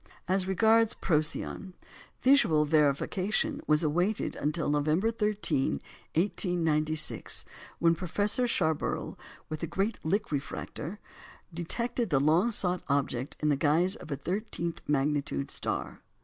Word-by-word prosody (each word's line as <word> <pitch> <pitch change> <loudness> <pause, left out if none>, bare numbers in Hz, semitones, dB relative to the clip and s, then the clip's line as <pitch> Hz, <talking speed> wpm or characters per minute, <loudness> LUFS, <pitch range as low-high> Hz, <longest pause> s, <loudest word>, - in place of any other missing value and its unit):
As 185 +1 +1
regards 220 +4 +4
Procyon, 165 +3 -1 0.5
visual 205 - +5
verification 185 - +1
was 150 +1 +3
awaited 175 +7 0
until 150 +3 -1
November 155 +9 +1
13, 210 - 0 0.4
1896, 160 -4 +1 0.3
when 165 0 +4
Professor 205 +7 0
Schaeberle, 160 -9 -1 0.3
with 155 - -5
the 165 - -3
great 195 +7 -1
Lick 200 +5 -1
refractor, 150 +5 -4 0.6
detected 230 +7 -1
the 140 -5 +3
long 165 - +3
sought 180 -4 0
object 135 -2 -1
in 150 - +2
the 145 - +3
guise 160 +6 +2
of - - -11
a 140 - -1
thirteenth 170 +1 -3
magnitude 140 - 0
star. - - -3
170 Hz, 120 wpm, -29 LUFS, 150-200 Hz, 0.6 s, visual